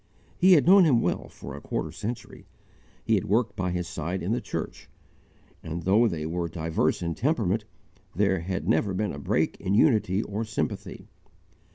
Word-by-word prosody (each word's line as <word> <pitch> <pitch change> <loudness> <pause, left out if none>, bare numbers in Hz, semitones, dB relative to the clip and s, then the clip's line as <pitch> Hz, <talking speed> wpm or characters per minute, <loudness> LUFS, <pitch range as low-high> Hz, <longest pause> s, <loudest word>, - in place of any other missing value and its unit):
"_ - - -40 0.3
He 185 +1 +6
had 155 - +5
known 190 +2 +8
him 140 -8 +4
well - - -1
for - - -10
a - - -9
quarter 80 - -3
century; 110 +8 -7 0.6
he - - +1
had - - +2
worked 110 +1 +1
by 90 -3 -1
his 90 -1 -2
side 85 +4 -4
in 95 - -1
the 120 - 0
church; - - -6 0.7
and 80 +1 -5
though 105 +7 +4
they 80 -7 -3
were 85 +1 -2
diverse 80 +1 -1
in 85 -1 -1
temperament, 110 - 0 0.5
there 95 0 +2
had 95 +3 -4
never 95 -2 +1
been 105 0 -1
a 70 - -7
break - - 0
in 95 +2 0
unity 105 - +3
or 105 +2 -3
sympathy. 110 0 -4
95 Hz, 185 wpm, -26 LUFS, 85-115 Hz, 0.7 s, known